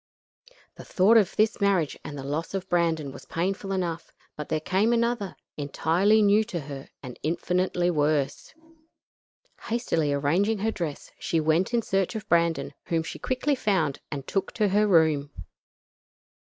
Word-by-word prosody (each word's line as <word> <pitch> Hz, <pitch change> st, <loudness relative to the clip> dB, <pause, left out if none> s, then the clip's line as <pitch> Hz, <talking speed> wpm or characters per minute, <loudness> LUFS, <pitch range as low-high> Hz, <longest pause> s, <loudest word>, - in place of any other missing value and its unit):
The -, -, -9 dB
thought 200 Hz, +5 st, +3 dB
of 210 Hz, -5 st, +4 dB
this 215 Hz, 0 st, +1 dB
marriage 190 Hz, -7 st, +2 dB
and 145 Hz, -, -7 dB
of 135 Hz, -, -6 dB
the 140 Hz, -, -4 dB
loss 165 Hz, +5 st, -3 dB
of 190 Hz, -1 st, -4 dB
Brandon 165 Hz, -5 st, 0 dB
was -, -, -12 dB
painful 195 Hz, +3 st, -2 dB
enough, 175 Hz, -3 st, -3 dB, 0.2 s
but 150 Hz, -, -7 dB
there 155 Hz, -, 0 dB
came 195 Hz, +8 st, +1 dB
another, 235 Hz, -4 st, 0 dB, 0.2 s
entirely 170 Hz, +9 st, +2 dB
new 205 Hz, +2 st, +4 dB
to 175 Hz, -5 st, -4 dB
her 140 Hz, -1 st, -8 dB
and 125 Hz, -2 st, -9 dB
infinitely 180 Hz, +2 st, 0 dB
worse. 150 Hz, -, -1 dB, 1.1 s
Hastily 165 Hz, -11 st, 0 dB
arranging 170 Hz, +10 st, +1 dB
her 220 Hz, +3 st, 0 dB
dress, 165 Hz, -8 st, -5 dB
she 165 Hz, -, 0 dB
went 160 Hz, +5 st, +1 dB
in 235 Hz, -1 st, +1 dB
search 195 Hz, +2 st, 0 dB
of 215 Hz, -1 st, -5 dB
Brandon, 170 Hz, -1 st, +1 dB
whom 165 Hz, -1 st, 0 dB
she -, -, -7 dB
quickly 255 Hz, +3 st, 0 dB
found 190 Hz, -, 0 dB
and 140 Hz, -2 st, -5 dB
took 195 Hz, -, -2 dB
to 210 Hz, -3 st, +1 dB
her 210 Hz, +2 st, +3 dB
room. 160 Hz, -6 st, +3 dB
175 Hz, 160 wpm, -26 LUFS, 155-205 Hz, 1.1 s, of